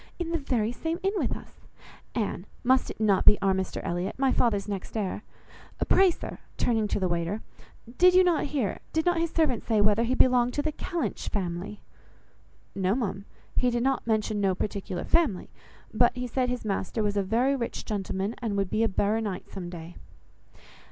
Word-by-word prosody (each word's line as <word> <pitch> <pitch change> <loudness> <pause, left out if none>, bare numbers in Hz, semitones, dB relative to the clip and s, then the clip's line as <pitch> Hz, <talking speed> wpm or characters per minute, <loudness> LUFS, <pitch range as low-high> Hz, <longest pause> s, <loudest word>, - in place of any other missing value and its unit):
In 345 -2 -3
the 335 - 0
very 235 -6 0
same 325 +7 -3
inn 390 +1 +1
with - - -1
us! - - -16 0.5
Anne, 205 -4 -2 0.2
must 260 +1 +3
not 205 -3 +4
it - - -3
be 210 - +8
our 195 -1 +4
Mr 190 -1 -2
Elliot? 175 +2 -2
my 270 0 +2
father's 210 -6 +1
next 200 +2 -4
heir? 205 -1 -2 0.7
Pray 385 -1 +6
sir," 340 - -6 0.2
turning 225 -3 +1
to 205 - -1
the 185 - +1
waiter, 175 +4 -2 0.6
"did 365 0 +7
not 345 -3 +2
you - - -5
hear, 255 -10 -1
did 320 0 +1
not 350 -1 +3
his 335 0 +1
servant 310 -8 +1
say 220 -2 +1
whether 210 +2 +4
he 250 +2 +1
belonged 250 -1 +4
to 290 - 0
the 310 - 0
Kellynch 345 +2 -3
family?" 185 +1 -4 0.9
"No, 190 +1 +1
ma'am, 200 -5 -3 0.3
he 250 - +3
did 240 0 0
not 270 -2 0
mention 215 -1 +1
no 190 -2 +2
particular 195 -3 -3
family; 305 - +1 0.4
but 240 +3 +4
he 250 - -2
said 250 +1 0
his 245 -2 -3
master 205 +2 -1
was 205 -1 0
a 200 - +2
very 235 +8 +2
rich 235 -3 -4
gentleman, 195 0 -2
and 215 -4 -1
would 195 -2 -1
be 220 - +2
a - - +4
baronight 205 0 -1
some 180 -3 -6
day." 170 0 -9
220 Hz, 190 wpm, -27 LUFS, 195-260 Hz, 0.9 s, be